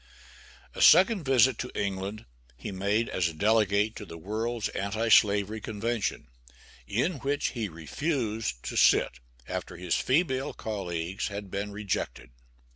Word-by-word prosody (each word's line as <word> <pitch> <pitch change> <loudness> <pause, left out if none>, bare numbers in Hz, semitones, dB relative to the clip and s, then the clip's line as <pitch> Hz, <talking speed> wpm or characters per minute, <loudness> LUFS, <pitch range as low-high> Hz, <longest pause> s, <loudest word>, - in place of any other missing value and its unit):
A - - -5
second 195 -3 +6
visit 130 -2 +4
to 125 - -3
England 100 +2 -3 0.3
he - - -6
made 100 +4 0
as 90 -2 0
a 80 - -10
delegate 105 +2 +2
to - - -7
the 85 -5 -9
World's 110 +6 -2
Anti 110 +4 -2
slavery 105 0 +4
Convention, 110 +1 -2 0.6
in 135 - 0
which 145 +2 -1
he 115 -5 -4
refused 105 - -3
to - - -5
sit - - +4 0.3
after - - -5
his 90 0 -2
female 135 -1 +1
colleagues 95 -3 -3
had 100 -2 -7
been 100 +1 -3
rejected. 100 - -4
105 Hz, 135 wpm, -28 LUFS, 100-120 Hz, 0.6 s, second